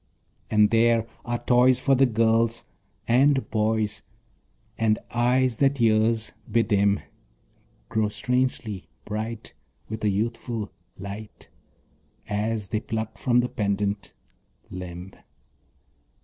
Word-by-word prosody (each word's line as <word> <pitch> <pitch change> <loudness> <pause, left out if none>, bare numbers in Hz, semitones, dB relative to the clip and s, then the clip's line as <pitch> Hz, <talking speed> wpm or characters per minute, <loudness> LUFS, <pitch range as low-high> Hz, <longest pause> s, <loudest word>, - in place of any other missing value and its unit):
And 105 -1 +4
there 115 0 +4 0.2
are 120 -1 -1
toys 125 +1 +4
for 135 +1 +2
the 135 0 +5
girls 115 0 +2 0.4
and 135 +3 +4
boys; 110 -1 0 0.7
And 110 -1 +2
eyes 125 0 +2
that 140 0 +2
years 110 0 +2 0.2
bedim 100 -3 +2 0.9
Grow 110 -1 0
strangely 125 -4 -1 0.2
bright, 110 +2 -5 0.4
with 110 0 -5
a 105 - +3
youthful 110 +1 -2 0.3
light, 100 +2 -9 0.8
As 105 0 -2
they 110 - 0
pluck 110 -1 -4
from 125 -1 +3
the 125 - -2
pendant 100 -1 -1 0.6
limb. 90 0 -7
110 Hz, 105 wpm, -25 LUFS, 105-120 Hz, 0.9 s, the